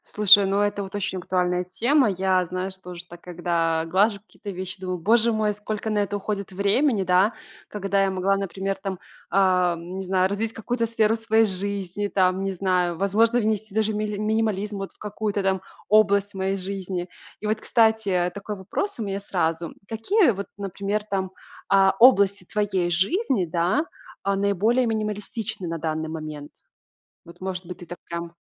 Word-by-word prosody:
Слушай, 205 Hz, -1 st, +7 dB
ну, 195 Hz, +1 st, +1 dB
это 205 Hz, 0 st, 0 dB
вот 190 Hz, -, -9 dB
очень 190 Hz, -2 st, -2 dB
актуальная 180 Hz, 0 st, 0 dB
тема. 235 Hz, +8 st, +2 dB
Я 185 Hz, -1 st, +1 dB
знаю, 185 Hz, +2 st, -3 dB
что 190 Hz, -1 st, -5 dB
уже 175 Hz, 0 st, -8 dB
так, 175 Hz, 0 st, -13 dB
когда 170 Hz, -2 st, -1 dB
глажу 200 Hz, +4 st, +2 dB
какие-то 205 Hz, 0 st, -11 dB
вещи, 185 Hz, 0 st, -6 dB
думаю: 185 Hz, -1 st, -3 dB
"Боже 230 Hz, +6 st, +3 dB
мой, 215 Hz, -1 st, +1 dB
сколько 210 Hz, +1 st, -4 dB
на 210 Hz, -1 st, +1 dB
это 205 Hz, 0 st, -1 dB
уходит 200 Hz, -1 st, -4 dB
времени". 200 Hz, +4 st, +2 dB
Да? 185 Hz, +4 st, +3 dB, 0.4 s
Когда 200 Hz, -1 st, 0 dB
я 195 Hz, -, +1 dB
могла, 190 Hz, +1 st, +1 dB
например, 195 Hz, 0 st, -2 dB
там, 190 Hz, -2 st, -5 dB, 0.3 s
ам, 180 Hz, -2 st, +2 dB
не 190 Hz, -, -4 dB
знаю, 185 Hz, 0 st, +2 dB
развить 215 Hz, +3 st, -2 dB
какую-то 230 Hz, +1 st, -2 dB
сферу 225 Hz, -1 st, +2 dB
своей 225 Hz, 0 st, +3 dB
жизни, 200 Hz, 0 st, -2 dB
там, 185 Hz, -1 st, +2 dB
не 195 Hz, -, -1 dB
знаю, 180 Hz, -2 st, 0 dB
возможно, 225 Hz, +6 st, +3 dB
внести 215 Hz, -2 st, -1 dB
даже 220 Hz, 0 st, +1 dB
мили 210 Hz, 0 st, -2 dB
минимализм 210 Hz, -1 st, -1 dB
вот 195 Hz, -, -5 dB
в -, -, -34 dB
какую-то 210 Hz, -1 st, -3 dB
там 190 Hz, -1 st, +1 dB, 0.3 s
область 205 Hz, -1 st, +4 dB
моей 190 Hz, 0 st, -1 dB
жизни. 185 Hz, -2 st, -4 dB, 0.3 s
И 210 Hz, -, -4 dB
вот, 215 Hz, 0 st, 0 dB
кстати, 220 Hz, -6 st, +2 dB
такой 205 Hz, +1 st, -5 dB
вопрос 200 Hz, -, -3 dB
у -, -, -1 dB
меня 195 Hz, -1 st, -3 dB
сразу. 170 Hz, -3 st, -1 dB
М, -, -, -13 dB
какие 250 Hz, -, +3 dB
вот, 200 Hz, -1 st, -5 dB
например, 200 Hz, +1 st, -3 dB
там, 190 Hz, -3 st, -2 dB, 0.4 s
а, 195 Hz, -1 st, +5 dB
области 200 Hz, -6 st, +6 dB
твоей 190 Hz, -2 st, -1 dB
жизни, 200 Hz, -, +1 dB
да, 175 Hz, -, +1 dB, 0.4 s
а, 200 Hz, 0 st, +1 dB
наиболее 200 Hz, +5 st, +2 dB
минималистичны 215 Hz, -2 st, -3 dB
на 165 Hz, -, -3 dB
данный 160 Hz, 0 st, -2 dB
момент? 155 Hz, -2 st, -7 dB, 0.7 s
Вот, 170 Hz, -, -15 dB
может 185 Hz, -1 st, -4 dB
быть, 180 Hz, 0 st, -8 dB
ты 175 Hz, -, -11 dB
так 175 Hz, -, -8 dB
прям 170 Hz, 0 st, -5 dB
195 Hz, 175 wpm, -24 LUFS, 185-210 Hz, 0.7 s, Слушай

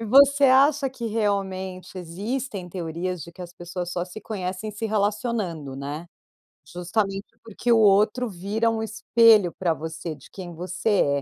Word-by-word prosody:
e -, -, -4 dB
você 280 Hz, +4 st, +6 dB
acha 275 Hz, +1 st, +5 dB
que 245 Hz, -3 st, -5 dB
realmente 190 Hz, -4 st, -2 dB
existem 195 Hz, +3 st, -4 dB
teorias 175 Hz, 0 st, -4 dB
de 170 Hz, -, -11 dB
que 180 Hz, -, -9 dB
as 175 Hz, -1 st, -9 dB
pessoas 175 Hz, 0 st, -5 dB
só 175 Hz, -1 st, -2 dB
se 180 Hz, +4 st, -10 dB
conhecem 190 Hz, 0 st, -4 dB
se 215 Hz, +2 st, -4 dB
relacionando, 205 Hz, -, -1 dB
né? 145 Hz, +4 st, -5 dB, 0.6 s
Justamente 195 Hz, +4 st, -2 dB, 0.2 s
porque 230 Hz, +2 st, -3 dB
o 230 Hz, -, +6 dB
outro 215 Hz, +4 st, +4 dB
vira 205 Hz, +5 st, 0 dB
um 225 Hz, -1 st, -2 dB
espelho 220 Hz, -3 st, +4 dB
pra 170 Hz, -3 st, +1 dB
você 160 Hz, +2 st, -5 dB
de 140 Hz, -, -16 dB
quem 180 Hz, -3 st, -8 dB
você 180 Hz, -4 st, +1 dB
195 Hz, 155 wpm, -25 LUFS, 175-220 Hz, 0.6 s, você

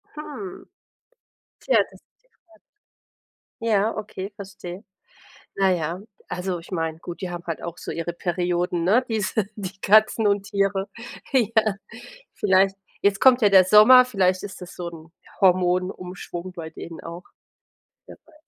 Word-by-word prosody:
Hm. 290 Hz, -11 st, -8 dB, 0.9 s
Tja -, -, +2 dB
das -, -, -18 dB
ist -, -, -47 dB, 0.2 s
die -, -, -35 dB, 0.2 s
Fra 330 Hz, -1 st, -23 dB, 1.1 s
Ja, 220 Hz, -1 st, +1 dB
okay, 205 Hz, -2 st, -6 dB
verstehe. 195 Hz, -2 st, -9 dB, 0.7 s
Na 195 Hz, -1 st, +2 dB
ja, 170 Hz, +1 st, -2 dB, 0.3 s
also 180 Hz, 0 st, -3 dB
ich 170 Hz, +2 st, -13 dB
meine, 165 Hz, -3 st, -2 dB
gut, 170 Hz, +2 st, -9 dB
die 185 Hz, -, -3 dB
haben 175 Hz, -1 st, -6 dB
halt 165 Hz, -2 st, -4 dB
auch 170 Hz, 0 st, -6 dB
so -, -, -6 dB
ihre 165 Hz, +1 st, -3 dB
Perioden, 175 Hz, 0 st, -1 dB
ne, 220 Hz, +9 st, +3 dB
diese 220 Hz, -2 st, -1 dB
die 195 Hz, -2 st, -7 dB
Katzen 215 Hz, +2 st, +4 dB
und 200 Hz, -1 st, +2 dB
Tiere, 195 Hz, -1 st, 0 dB, 0.4 s
ja. 220 Hz, -4 st, +2 dB, 0.6 s
Vielleicht 195 Hz, -1 st, +3 dB, 0.3 s
jetzt 200 Hz, -1 st, +3 dB
kommt 255 Hz, -2 st, +6 dB
ja 205 Hz, -, +6 dB
der 190 Hz, -2 st, +7 dB
Sommer, 215 Hz, +6 st, +8 dB
vielleicht 190 Hz, -7 st, +1 dB
ist 200 Hz, -1 st, -8 dB
das 180 Hz, -, -10 dB
so 175 Hz, -, -5 dB
'n 165 Hz, -1 st, -13 dB, 0.3 s
Hormonumschwung 180 Hz, -1 st, 0 dB
bei 160 Hz, -2 st, -8 dB
denen 165 Hz, 0 st, -9 dB
auch, 170 Hz, +2 st, -8 dB, 0.8 s
wer -, -, -13 dB
wei 320 Hz, -, -23 dB
190 Hz, 150 wpm, -23 LUFS, 175-210 Hz, 1.1 s, Sommer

